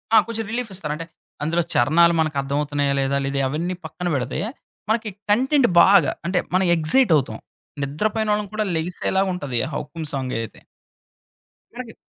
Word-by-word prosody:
ఆ! - - +9
కొంచెం 225 -1 -3
రిలీఫిస్తారు. 195 -10 -3
అంటే, 165 +2 -7 0.4
అందులో 170 +3 +1
చరణాలు 170 +7 +4
మనకర్థమవుతున్నాయా 145 -1 0
లేదా? 135 +1 0
లేదా 140 0 -1
అవన్నీ 170 +5 -2
పక్కన 180 +3 -5
బెడితే 130 +1 -2 0.5
మనకి 220 0 0 0.2
కంటెంట్ 260 +4 +3
బాగా. 195 -6 +5
అంటే 180 +1 +1
మనం 185 +1 +3
ఎక్సైట్ 170 +7 +3
అవుతాం. 125 -6 -3 0.5
నిద్రపోయిన 210 +10 -1
వాళ్ళని 210 -2 -2
కూడా 215 0 0
లెగిసేలా 180 +3 -1
ఉంటది. 145 -8 -3
ఆ - - -7
'హుకుమ్' 155 +1 -4
సాంగ్ 130 -2 -3
అయితే. 115 - -8 1.1
మనకి 240 -2 -8
170 Hz, 145 wpm, -22 LUFS, 145-210 Hz, 1.1 s, ఆ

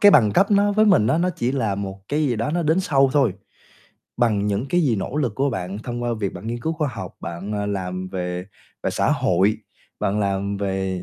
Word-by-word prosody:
cái 205 - +8
bằng 120 - +6
cấp 195 - +3
nó 205 0 +4
với 215 +1 +4
mình 195 - +5
á, 155 - +2
nó 180 +2 +2
chỉ 120 +2 0
là 115 -8 0
một 95 -1 -5
cái 150 +2 0
gì 120 -4 0
đó 115 +5 -1
nó 170 +2 0
đến 160 +3 +2
sau 135 -7 +3
thôi, 135 -10 +3 0.8
bằng 110 -4 +2
những 105 +5 -1
cái 175 +5 +2
gì 125 -8 +2
nỗ 115 +7 -4
lực 130 -8 0
của 140 +3 +1
bạn 95 -3 -4
thông 120 +2 -5
qua 120 - -1
việc 100 -2 -1
bạn - - -8
nghiên 120 +1 -3
cứu 160 +6 -1
khoa 155 -2 -1
học, 120 - -7
bạn, 85 +5 -5
à, 105 0 -2
làm 95 -2 -3
về 90 -1 -4 0.4
về - - +1
xã - - +1
hội, 95 +4 +2 0.4
bạn 100 +2 0
làm 100 0 -1
về 95 -2 -2
110 Hz, 240 wpm, -22 LUFS, 100-145 Hz, 0.8 s, cái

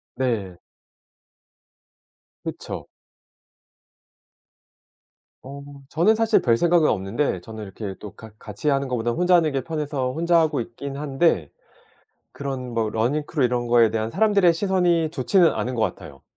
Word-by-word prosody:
네. 110 -9 -2 1.9
그쵸. 160 - -6 2.6
어 140 +2 -9 0.3
저는 175 +7 +3
사실 225 0 +3
별생각은 160 +7 +3
없는데 95 +1 -1
저는 110 +3 -9
이렇게 95 0 -7
또 105 - -9
같 110 -2 -13
같이 105 +8 -4
하는 140 -1 +1
것보다는 120 -2 -2
혼자 180 0 +4
하는 160 -3 +3
게 135 - -1
편해서 145 -4 -2
혼자 170 +4 +2
하고 155 -5 +1
있긴 135 +4 -7
한데 140 - +1 0.8
그런 130 -3 -5
뭐 115 -1 0
러닝 120 +8 0
크루 145 -5 0
이런 120 0 0
거에 115 -2 +4
대한 110 0 -2
사람들의 200 - +3
시선이 175 -3 +1
좋지는 170 +6 +3
않은 125 +1 -3
것 115 - -1
같아요. 70 -9 -5
135 Hz, 275 characters per minute, -23 LUFS, 115-165 Hz, 2.6 s, 혼자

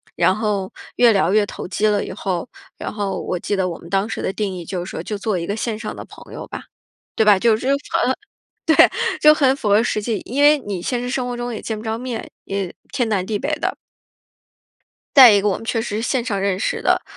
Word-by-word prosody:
然 185 - +3
后 205 -3 -2 0.3
越 240 -2 +6
聊 190 -3 +2
越 210 -1 +4
投 - - -7
机 215 +4 0
了 205 -1 +1
以 - - -6
后， 185 +2 -3 0.3
然 - - -5
后 200 -3 -3
我 180 - -3
记 205 - -2
得 190 -2 0
我 170 - -6
们 170 - -13
当 195 +2 +1
时 - - -4
的 190 - -2
定 205 -2 -2
义 175 -2 -7
就 185 -1 -4
是 185 - -8
说 - - -5
就 210 - -4
做 205 -1 -1
一 170 - -5
个 200 - -2
线 220 -1 -3
上 220 - -5
的 - - -7
朋 - - -14
友 - - -7
吧， - - -8 0.5
对 220 - +3
吧？ 205 -2 +6
就 225 +1 +4
符 240 - -7
合 275 -2 0 0.8
对， - - -1
就 305 0 +7
很 270 -3 +3
符 220 -6 -3
合 205 +2 +5
实 215 -2 -1
际。 220 0 -1
因 275 +5 0
为 295 0 +6
你 200 -8 -5
现 240 +6 -2
实 245 - -4
生 255 0 -1
活 245 -1 -4
中 240 0 -4
也 - - -6
见 220 - -4
不 215 - -9
着 220 0 -2
面， 245 -2 -5
也 195 -2 -4 0.2
天 250 -4 0
南 200 -4 0
地 210 0 -2
北 280 - -2
的。 - - -2 1.4
再 255 -5 +10
一 205 - +4
个 210 - +2
我 195 - +1
们 - - -10
确 225 0 -1
实 210 -2 -4
是 220 - -2
线 250 0 0
上 200 -5 -2
认 195 -1 0
识 - - -1
的， - - +2
215 Hz, 275 characters per minute, -20 LUFS, 195-240 Hz, 1.4 s, 再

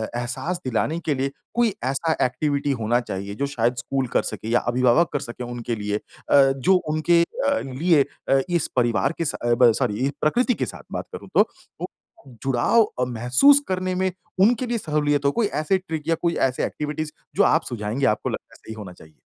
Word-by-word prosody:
एहसास 130 +9 -3
दिलाने 130 +7 0
के 150 - +1
लिए 135 +1 -1 0.2
कोई 235 -3 +2
ऐसा 135 +5 0
एक्टिविटी 140 +2 -1
होना 120 +3 +2
चाहिए, 100 -4 -5
जो 140 - -1
शायद 120 -3 0
स्कूल 130 +2 -2
कर - - +5
सके - - -6
या 120 +1 +3
अभिभावक 130 +7 +3
कर 145 - 0
सके 120 -1 -7
उनके 120 -1 -4
लिए 105 -1 -2
अ, 140 +5 +1 0.2
जो 185 +9 +3 0.2
उनके 170 +2 +3 0.3
अ, 280 0 +2
लिए 145 +3 +2 0.3
अ, 135 - +5
इस 170 -3 +1
परिवार 120 -3 +2
के 165 - -1
सा 120 -4 0
ब 120 -1 +6
सॉरी 125 -1 0
ई - - +1
प्रकृति 245 - +2
के 130 - -2
साथ - - -9
बात - - -4
करूँ - - -10
तो, - - +5 0.3
वो - - -2 0.6
जुड़ाव 135 - +3 0.2
अ, 125 - +2
महसूस 125 - +4
करने 185 0 -1
में 185 0 0 0.3
उनके 235 +5 +4
लिए 240 0 -1
सहूलियत 150 -6 0
हो? 140 - +4
कोई 220 +6 +1
ऐसे 155 +2 0
ट्रिक 160 -5 -6
या 165 - +3
कोई 170 -1 +1 0.2
ऐसे 125 - -2
एक्टिविटीज़ 150 +1 -4 0.2
जो - - +4
आप - - +3
सुझाएँगे, 115 +4 -2
आपको 105 -4 +1
लगता - - -7
सही 110 - -10
होना 105 -4 -9
चाहिए? 80 -3 -18
135 Hz, 200 wpm, -23 LUFS, 120-170 Hz, 0.6 s, ब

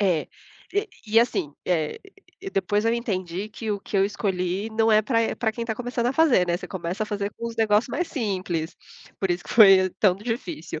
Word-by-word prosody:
É, 180 -6 +1 0.4
e 410 +2 0 0.2
e 225 +2 +5
assim, 180 -11 -1
eh, 160 -4 -1 0.5
depois 205 +2 0
eu 230 +1 +2
entendi 195 -4 -3
que 220 +1 -5
o 205 -1 -2
que 200 - -4
eu 195 - +4
escolhi 195 0 -2
não 225 0 +2
é 215 - +5
pra, 230 0 +1
eh, - - -1
pra 230 -3 0
quem 230 +2 -5
tá 225 -1 -2
começando 245 0 -2
a 250 - +1
fazer, 280 - +4
né, 175 0 +1
você - - -9
começa 185 +2 -4
a 215 - -2
fazer 205 -1 -3
com 235 - -5
os 230 - -9
negócios 215 +1 +3
mais 345 +7 -2
simples, 185 - -3 0.4
por 190 -2 -1
isso 175 -1 -1
que - - -8
foi 195 -4 +7
tão 195 -4 +4
difícil. 195 -7 -5
205 Hz, 215 wpm, -24 LUFS, 185-230 Hz, 0.5 s, foi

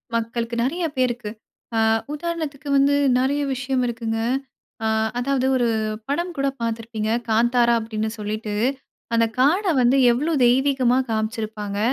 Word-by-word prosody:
மக்களுக்கு 230 +1 -2
நெறைய 335 +7 -1
பேருக்கு. 245 -4 -1 0.4
அ - - +2 0.3
உதாரணத்துக்கு 305 -3 -4
வந்து 280 +1 +4 0.2
நெறைய 275 +3 +1
விஷயம் 260 0 -1
இருக்குங்க. 225 -1 -3 0.7
அ - - +2 0.3
அதாவது 265 +1 0
ஒரு 240 -1 +2 0.4
படம் 345 +5 -1
கூட 275 0 +1
பார்த்துருப்பீங்க 225 -1 -3 0.2
"காந்தாரா" 235 +2 +3
அப்படின்னு 220 -1 -3
சொல்லிட்டு. 210 0 -4 0.6
அந்த 230 0 +4
காட 325 +11 +3 0.2
வந்து 250 +2 +4
எவ்வளோ 295 +8 0
தெய்வீகமா 255 0 +3
காமிச்சிருப்பாங்க. 215 -2 -3
240 Hz, 120 wpm, -22 LUFS, 225-275 Hz, 0.7 s, வந்து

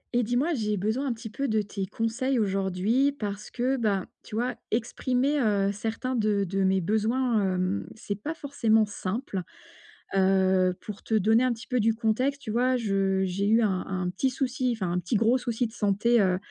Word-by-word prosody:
Et 245 - +4
dis-moi 245 +9 +1
j'ai 210 -6 -1
besoin 220 +8 -1
un 250 - 0
petit 225 -1 -9
peu 275 +5 -2
de 220 -2 +1
tes 200 -1 -5
conseils 235 +6 -1
aujourd'hui, 195 +6 +1
parce 210 -6 -5
que, 260 +2 0
bah, 205 -5 0 0.2
tu - - -9
vois, 245 +2 -1
exprimer, 255 +5 0
heu, 200 -3 +2
certains 225 +5 -3
de 210 -3 +1
de 195 +1 -1
mes 190 0 +2
besoins, 220 0 +1
hem, 185 +2 -1
c'est 215 -2 -4
pas 310 +8 -4
forcément 230 -8 +2
simple. 205 0 -4 0.7
Heu, 190 -1 +3
pour 210 -2 -8
te 220 - 0
donner 220 +3 +4
un 255 - +2
petit 230 0 -10
peu 250 -2 0
du 225 0 +2
contexte, 250 +5 0
tu 215 - -4
vois, 250 +3 +2
je 195 -4 +1
j'ai 190 +2 -1
eu 225 +2 +4
un 190 -3 0
un 185 -1 -2
petit 260 +9 0
souci 255 -1 -1
enfin, 190 -6 -2
un 180 - 0
petit 180 +7 -2
gros 225 +4 +4
souci 240 -1 -1
de 220 - -15
santé, 215 +2 +2
heu 185 -2 +2
220 Hz, 195 wpm, -27 LUFS, 195-245 Hz, 0.7 s, Et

